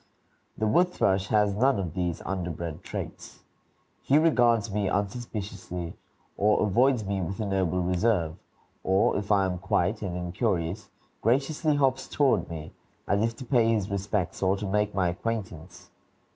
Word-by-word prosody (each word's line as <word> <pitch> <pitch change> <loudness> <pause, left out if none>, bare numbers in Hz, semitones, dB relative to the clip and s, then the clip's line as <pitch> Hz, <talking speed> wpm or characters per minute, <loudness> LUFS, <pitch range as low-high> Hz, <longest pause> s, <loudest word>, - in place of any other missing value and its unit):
The 110 - 0
wood 175 +12 +3
thrush 95 - +1
has 105 -2 +2
none 130 +6 +3
of 90 -5 -3
these 90 -3 -2
underbred 85 -3 -4
traits. - - -7 0.6
He 140 - +3
regards 120 -9 +3
me 100 -2 0
unsuspiciously, 100 -5 -4 0.4
or 105 +1 +3
avoids 120 +2 +3
me 100 0 -1
with 95 +4 -4
a 110 - -1
noble 95 -2 0
reserve 90 -3 +1 0.5
or, 95 +2 +3
if 100 +1 -2
I 100 -2 +4
am 90 -1 -2
quiet 90 +4 0
and 90 -4 -3
incurious, 90 +1 -2 0.3
graciously 145 +6 +1
hops 135 -2 +1
toward 140 -3 +2
me, 80 -2 -7 0.4
as 100 0 +2
if 115 +1 0
to 130 - -9
pay 120 -3 +3
his 105 -4 0
respects, 100 -2 -2
or 95 +1 +2
to 105 - -4
make 105 +1 0
my 95 -2 +2
acquaintance. 90 -3 -5
100 Hz, 155 wpm, -27 LUFS, 90-115 Hz, 0.6 s, I